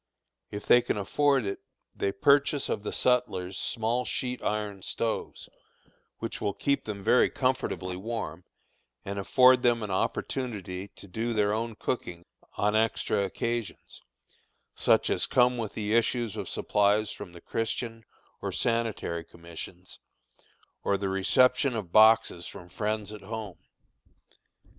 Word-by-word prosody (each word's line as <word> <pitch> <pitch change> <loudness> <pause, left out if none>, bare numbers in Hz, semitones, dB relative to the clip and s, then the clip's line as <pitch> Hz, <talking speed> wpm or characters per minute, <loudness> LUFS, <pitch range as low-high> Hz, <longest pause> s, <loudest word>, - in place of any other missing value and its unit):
If 105 0 -6
they 120 - +7
can 120 - -2
afford 135 +5 +2
it, 100 - -3 0.4
they 100 - 0
purchase 140 +7 +3
of - - -1
the 105 - -4
sutlers 120 -7 0
small 115 +5 -1
sheet 125 -1 -3
iron 105 -2 -2
stoves, 115 +4 -3 0.7
which - - -5
will 100 -1 -1
keep 140 +3 0
them 100 -2 -5
very 125 - +5
comfortably 125 -8 -1
warm, 115 +5 -5 0.6
and 100 +1 -3
afford 125 +5 +5
them 120 -2 +2
an 105 - -4
opportunity 100 -2 -2
to 100 - -14
do 115 +6 -2
their 105 -1 +2
own 115 +1 -2
cooking 90 -8 -4 0.3
on 105 +1 +2
extra 110 -2 +1
occasions, 115 +3 -4 0.7
such - - +3
as - - +1
come 125 0 +4
with 110 -3 -4
the 105 0 -1
issues 115 -1 +1
of - - -5
supplies 105 +1 +2
from 90 - -9
the 85 - -11
Christian 115 +3 -3 0.4
or - - -2
Sanitary 115 -8 -1
Commissions, 85 +2 -10 0.8
or 100 - +2
the 100 0 -2
reception 125 +7 +3
of 100 -6 -4
boxes 110 -5 +5
from 90 - -10
friends 105 +1 -2
at 105 - -9
home. 110 -1 -6
110 Hz, 140 wpm, -28 LUFS, 100-120 Hz, 0.8 s, they